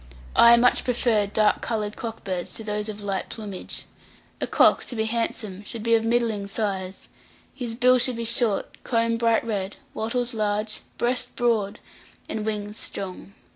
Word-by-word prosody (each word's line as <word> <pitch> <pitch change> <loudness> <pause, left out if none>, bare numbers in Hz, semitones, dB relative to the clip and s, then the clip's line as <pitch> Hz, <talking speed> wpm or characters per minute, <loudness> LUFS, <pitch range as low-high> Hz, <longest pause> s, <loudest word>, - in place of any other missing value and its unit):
I 235 0 +8
much 245 +1 +4
prefer 230 -4 +2
dark 210 +1 +2
coloured 215 -2 -2
cock 225 -1 -6
birds 185 -3 -4
to 225 - -8
those 210 0 -2
of 210 0 -6
light 195 -2 -3
plumage. 205 -4 -6 0.6
A - - 0
cock, - - +5
to 245 - -5
be 220 -1 0
handsome, 220 -3 -2
should 220 +1 -6
be 230 0 +2
of 225 -1 +4
middling 225 -3 +1
size; 195 -3 -3 0.5
his 240 -4 -4
bill 250 +1 +5
should 245 0 +2
be 230 0 -3
short, 230 -3 0
comb 230 -1 +1
bright 230 0 +2
red, 200 -3 -2 0.2
wattles 240 +2 -1
large, 215 0 -1 0.2
breast 245 +1 0
broad, 220 -4 +1 0.5
and 215 0 -3
wings 210 0 -3
strong. 195 +1 -5
220 Hz, 165 wpm, -25 LUFS, 205-235 Hz, 0.6 s, I